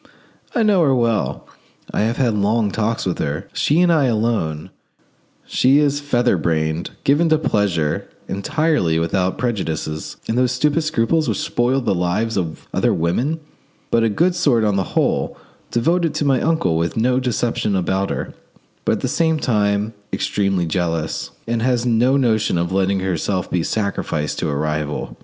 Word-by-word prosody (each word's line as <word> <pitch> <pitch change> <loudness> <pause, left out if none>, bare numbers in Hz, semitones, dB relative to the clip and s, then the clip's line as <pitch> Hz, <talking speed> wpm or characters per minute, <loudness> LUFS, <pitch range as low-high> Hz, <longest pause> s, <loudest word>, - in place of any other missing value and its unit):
I 235 - +3
know 205 -4 +4
her 140 -5 +3
well; 115 -3 0 0.5
I - - +1
have 115 +2 0
had 120 -4 +2
long 105 +1 +1
talks 110 +3 -1
with 90 - -2
her, 75 +7 -3
she 155 +4 +2
and 175 -1 +4
I 150 -4 +3
alone: 110 -10 -1 0.7
she 135 +2 +3
is 145 -1 +2
feather 125 -7 +1
brained, 80 0 -1
given 155 +4 +3
to 155 - +4
pleasure, 100 - 0 0.2
entirely 100 - 0
without 90 +3 0
prejudices 80 -10 -3
and 115 +2 0
those 125 0 +2
stupid 150 +5 +1
scruples 155 +1 +1
which - - -1
spoil 135 -4 0
the 120 - 0
lives 95 +6 0
of 85 -4 -3
other - - +2
women; 125 - 0 0.5
but 115 - +3
a 115 - +3
good 170 - +2
sort 125 -9 +2
on 105 -2 +2
the 95 -2 -2
whole; - - +1 0.3
devoted 165 +7 +1
to 150 - 0
my 135 -2 +2
uncle, 155 - +1
with 85 +4 -1
no 125 +3 +2
deception 120 -4 -1
about 95 +1 0
her; - - -4 0.5
but - - +3
at - - -2
the - - 0
same 160 -1 +1
time 105 -4 0 0.2
extremely 95 -3 0
jealous, 80 -2 -2 0.2
and 115 0 -1
has 125 0 +1
no 125 +3 +3
notion 110 -8 +1
of 85 +1 -1
letting 95 0 +1
herself 95 +1 -2
be 90 - +1
sacrificed 100 -6 -2
to - - -1
a 70 - -1
rival. 75 -4 -2
110 Hz, 170 wpm, -20 LUFS, 90-130 Hz, 0.7 s, know